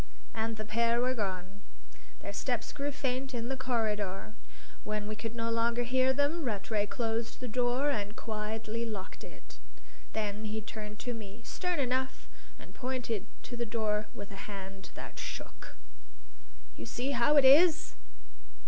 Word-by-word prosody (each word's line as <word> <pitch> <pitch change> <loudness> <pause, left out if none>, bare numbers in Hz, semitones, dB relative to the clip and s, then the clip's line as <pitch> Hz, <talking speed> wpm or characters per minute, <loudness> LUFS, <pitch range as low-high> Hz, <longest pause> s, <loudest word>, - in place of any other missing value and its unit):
And 225 0 -1
the 215 - -3
pair 230 +2 +3
were 255 +1 +3
gone; 195 -3 -3 0.6
their - - -4
steps - - -1
grew 285 0 -1
faint 265 -1 -1
in 235 +1 -2
the 270 - 0
corridor; 215 -5 0 0.5
when 210 0 -2
we 215 - -2
could 225 +1 -4
no 230 0 0
longer 230 +1 +3
hear 255 +2 +4
them, 285 +5 +2
Rattray 205 -3 0
closed 225 +1 -1
the 250 - -3
door 250 +4 +3
and 210 -4 -1
quietly 220 +1 -2
locked 210 -5 -5
it. - - -12 0.5
Then 210 0 -1
he 215 +1 -1
turned 210 -1 -6
to 245 - -2
me, 215 -1 -7
stern 360 -1 -1
enough, 260 -1 0 0.3
and - - -13
pointed 245 -5 -2 0.2
to 245 - -5
the 240 - 0
door 215 -2 +1
with 200 +1 -7
a 195 +1 -7
hand 195 -1 -6
that - - -7
shook. - - -6 1.0
"You - - -7
see 260 +3 -1
how 280 +4 +5
it 280 - +8
is?" 330 +5 +7
230 Hz, 155 wpm, -32 LUFS, 210-255 Hz, 1.0 s, it